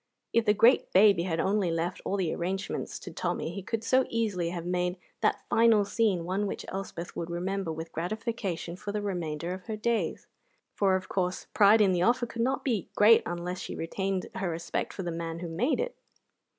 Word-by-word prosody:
If 230 -1 +3
the 210 -1 +4
great 230 +5 +5
baby 195 -3 +6
had 165 -3 -1
only 195 0 +1
left 165 +2 -2
all 200 - 0
the 175 -5 0
arrangements 190 +3 -3
to - - -9
Tommy, - - -2
he 195 - -5
could 220 +4 -3
so 260 +3 +3
easily 205 -7 0
have 170 -1 -5
made 180 0 -1 0.2
that - - +1
final 225 -3 +4
scene 200 -5 +1
one 195 +3 -1
which - - -5
Elspeth 190 -3 -6
would 170 - -4
remember 185 +1 -2
with 160 +1 -6
gratification 195 -2 -3
for 205 +2 -5
the 210 0 -2
remainder 170 -3 -3
of 185 0 -8
her 220 -1 -4
days; 230 +1 -1 0.5
for, 195 -2 +3
of 185 - -3
course, 180 -1 -1
pride 210 +2 +6
in 200 -2 +5
the 180 -1 +1
offer 240 +5 +3
could 230 0 -5
not 260 +3 0
be 225 - -1
great 220 +2 +7
unless 175 +1 -4
she - - -6
retained 190 +3 -2
her 190 -2 -2
respect 165 0 -3
for 190 - -6
the 175 - -3
man 165 0 -4
who 175 +1 -5
made 190 - 0
it. - - -2
190 Hz, 205 wpm, -29 LUFS, 175-215 Hz, 0.5 s, great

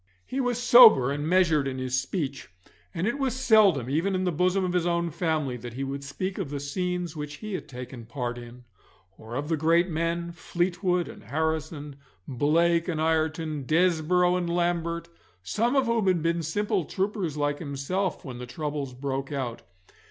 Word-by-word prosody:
He 265 - -4
was 245 -2 0
sober 240 - +8
and 145 +2 -2
measured 165 -5 +3
in 130 -1 -3
his 130 0 0
speech, 140 -1 -4 0.4
and 170 0 -2
it 240 +6 -1
was 265 -3 0
seldom, 210 - +4
even 165 +8 0
in 185 - 0
the 180 - +1
bosom 180 +3 +1
of 180 - -2
his 175 -1 +1
own 170 -1 0
family, 155 -6 -1
that 120 0 -8
he 135 - -3
would 140 +1 -4
speak 185 +8 -4
of 180 -8 -3
the 145 0 -4
scenes 180 +3 -3
which 150 -1 -5
he 215 +5 -7
had - - -4
taken 125 -2 -8
part 120 0 -4
in, 120 +1 -12 0.5
or 110 +3 -9
of 145 +3 -3
the 165 - +1
great 165 +4 +3
men, 170 +1 -2
Fleetwood 175 +1 -1
and - - -11
Harrison, 155 +1 -3 0.3
Blake 165 +6 +2
and 165 -4 -2
Ireton, 160 -2 0
Desborough 180 +2 +3
and 175 -1 -2
Lambert, 170 -1 -1 0.4
some 230 - 0
of 270 -1 +3
whom 230 -4 +1
had 175 -4 +2
been 170 0 +1
simple 200 +3 -1
troopers 190 -5 -2
like 145 0 0
himself 165 +5 -3
when 125 -3 -7
the 125 - -7
troubles 145 -2 -4
broke 135 +1 -3
out. 130 -5 -3
160 Hz, 180 wpm, -27 LUFS, 140-180 Hz, 0.5 s, sober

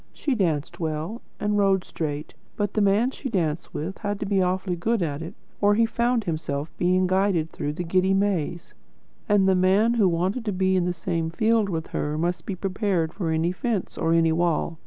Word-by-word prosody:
She 285 - -1
danced 165 - -1
well, 160 +7 -3 0.2
and 210 0 +1
rode 195 -2 +3
straight; 150 -2 -4 0.2
but 205 -2 -1
the 215 - +1
man 205 +5 +3
she 270 - -6
danced 165 -7 -1
with 170 +6 -5
had 205 -2 -3
to - - -1
be 195 -1 +2
awfully 185 0 0
good 215 +4 0
at 145 -2 -3
it, 165 +4 -7 0.3
or 205 0 +4
he 230 +1 +4
found 235 +1 +1
himself 155 -3 -3
being 185 +1 +3
guided 185 -3 +1
through 145 - -3
the 175 - -4
giddy 185 +3 +2
maze; 185 -4 -1 0.6
and 205 -2 +4
the 190 - +5
man 190 +5 +3
who 210 -6 +3
wanted 185 +8 -1
to 210 - 0
be 190 0 +2
in 180 -1 +2
the 180 - +1
same 165 -2 -2
field 220 +4 +2
with 165 -3 -3
her, 150 +1 -2
must 170 +1 -2
be 195 - -2
prepared 185 -3 -1
for 175 -5 -3
any 160 +2 +1
fence 205 +1 -2
or 165 - 0
any 165 -1 +4
wall. 165 -1 0
185 Hz, 205 wpm, -25 LUFS, 165-205 Hz, 0.6 s, the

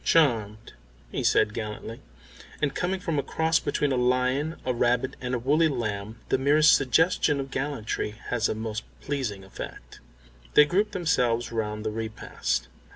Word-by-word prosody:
"Charmed," 110 -9 +2 0.4
he - - -2
said 105 - +3
gallantly, 110 +1 -5 0.6
and 145 -2 0
coming 185 +4 -1
from 165 -5 -1
a - - +2
cross 160 +3 +1
between 145 -1 0
a - - +2
lion, 125 +5 +1
a 130 - +1
rabbit, 125 +2 +1
and 125 0 -1
a - - +1
woolly 145 +7 +3
lamb 110 -5 -3
the - - +2
merest 150 +3 +5
suggestion 150 +2 +3
of 135 0 -5
gallantry 130 -6 -3
has 120 -2 +1
a - - -1
most 110 0 -4 0.2
pleasing 125 -9 -3
effect. - - -9 0.6
They 150 - +9
grouped 205 +7 +1
themselves 125 - +1
round 105 -1 -3
the 110 - 0
repast. 110 - -3
125 Hz, 155 wpm, -26 LUFS, 110-150 Hz, 0.6 s, They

